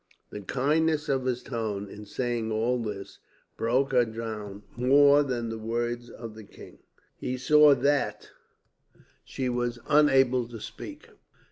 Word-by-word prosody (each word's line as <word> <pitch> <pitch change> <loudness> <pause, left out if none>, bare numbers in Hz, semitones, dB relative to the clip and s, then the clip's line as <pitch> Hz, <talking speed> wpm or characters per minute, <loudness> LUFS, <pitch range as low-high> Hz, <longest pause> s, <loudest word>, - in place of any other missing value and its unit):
"The 105 - -7
kindness 150 - 0
of 135 -2 0
his 125 -1 -1
tone, 110 -5 -3
in 105 +1 -11
saying 120 0 -2
all 115 +3 0
this, 105 -4 -6 0.4
broke 130 +5 +1
her 125 -2 +4
down 110 -3 -6
more 140 +4 +5
than 125 -5 -2
the 115 0 -5
words 120 +2 -3
of 115 -2 -9
the 110 0 -11
king. - - -14 0.4
He 130 - -3
saw 150 +2 +6
that 140 +1 0 0.9
she 130 - -4
was 120 -1 -1
unable 135 -4 +4
to 115 -1 -9
speak. - - -9
120 Hz, 140 wpm, -27 LUFS, 115-135 Hz, 0.9 s, saw